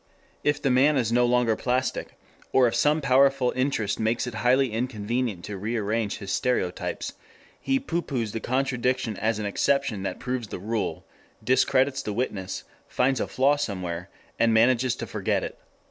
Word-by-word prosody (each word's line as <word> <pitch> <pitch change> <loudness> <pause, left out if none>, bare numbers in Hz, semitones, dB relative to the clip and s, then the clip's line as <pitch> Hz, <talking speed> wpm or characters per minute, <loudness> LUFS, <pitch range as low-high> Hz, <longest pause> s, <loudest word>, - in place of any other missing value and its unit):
If 145 0 +2
the 135 - +1
man 140 +4 +4
is 115 -3 +1
no 120 +1 +4
longer 120 -2 +3
plastic, 130 +2 -2 0.3
or 130 -2 +5
if 115 - -1
some 150 +6 +2
powerful 135 -1 +3
interest 130 -6 0
makes 110 +1 0
it 125 - -5
highly 125 +3 +2
inconvenient 115 -3 -2
to 100 0 -5
rearrange 110 0 -1
his 100 -2 -6
stereotypes, 95 -9 -1 0.5
he 270 0 +1
pooh 175 -10 -2
poohs 120 -9 -3
the 115 - -3
contradiction 125 -3 0
as 110 +2 0
an 105 - -3
exception 125 0 +1
that 95 - -3
proves 125 -2 -3
the - - -6
rule, 105 +3 -3 0.4
discredits 135 +1 +2
the 105 - -4
witness, 100 -5 -3 0.2
finds 130 +1 +1
a - - -1
flaw 140 +3 +2
somewhere, 90 -6 -4 0.3
and 115 0 +4
manages 120 +2 +3
to - - -5
forget - - -1
it. - - -5
120 Hz, 165 wpm, -26 LUFS, 110-130 Hz, 0.5 s, or